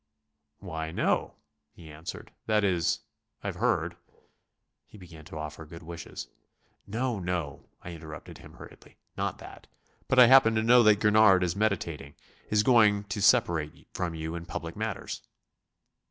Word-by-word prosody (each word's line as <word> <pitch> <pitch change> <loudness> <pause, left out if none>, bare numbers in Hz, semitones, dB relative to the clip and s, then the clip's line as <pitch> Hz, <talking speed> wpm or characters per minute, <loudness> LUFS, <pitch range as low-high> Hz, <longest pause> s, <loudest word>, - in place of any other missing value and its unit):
"Why, 80 -4 -5
no," 80 - 0 0.4
he 80 -3 -13
answered 75 +2 -9 0.2
"that 105 -1 +2
is... 90 -4 +1 0.4
I've - - -4
heard...." - - 0 0.9
he - - -15
began 85 -5 -13
to 80 - -9
offer 75 +1 -7
good 80 +1 -12
wishes. 85 +1 -8 0.6
"No, 115 +1 -2
no," 85 -6 -4
I 85 - -7
interrupted 80 -2 -10
him - - -14
hurriedly, - - -15 0.2
"not - - -2
that. - - -13 0.4
But 130 - +1
I 125 - +10
happen 120 -3 +6
to 110 - +1
know 120 +2 +6
that 105 -2 +4
Gurnard 105 -3 +5
is 90 0 -1
meditating... 85 -9 -2 0.3
is 105 0 +3
going 105 -4 +4
to 105 -1 -3
separate 95 -9 +2
from 85 -2 -3
you 80 0 -5
in 85 0 -7
public - - -6
matters." - - -4
90 Hz, 150 wpm, -28 LUFS, 80-110 Hz, 0.9 s, I